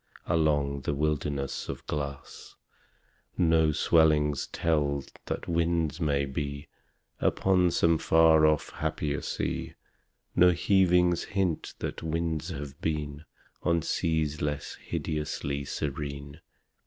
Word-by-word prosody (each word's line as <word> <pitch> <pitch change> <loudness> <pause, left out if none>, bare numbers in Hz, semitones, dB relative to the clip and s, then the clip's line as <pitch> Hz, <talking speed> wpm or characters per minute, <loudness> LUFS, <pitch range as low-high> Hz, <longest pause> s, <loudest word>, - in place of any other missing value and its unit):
Along 75 -3 +1
that 70 - -2
wilderness 70 -2 -2
of - - -6
glass 70 -2 -6 0.8
No 80 -3 +4
swellings 75 -2 +3
tell 75 -4 0 0.2
that - - -4
winds 85 -1 0
may 70 -3 +1
be 70 +1 -5 0.5
Upon 90 -2 +3
some 85 -1 +2
far 80 -1 +5
off 75 -1 +1
happier 75 -2 -2
sea - - -3 0.6
No 90 0 +6
heavings 90 -1 +3
hint 95 -6 -2
that - - -5
winds 80 -1 -2
have 70 0 -7
been 75 -1 -3 0.4
On 85 -2 +1
seas 80 -2 -1
less 75 0 -2
hideously 70 -2 -3
serene. 70 0 -5
75 Hz, 105 wpm, -28 LUFS, 70-85 Hz, 0.8 s, No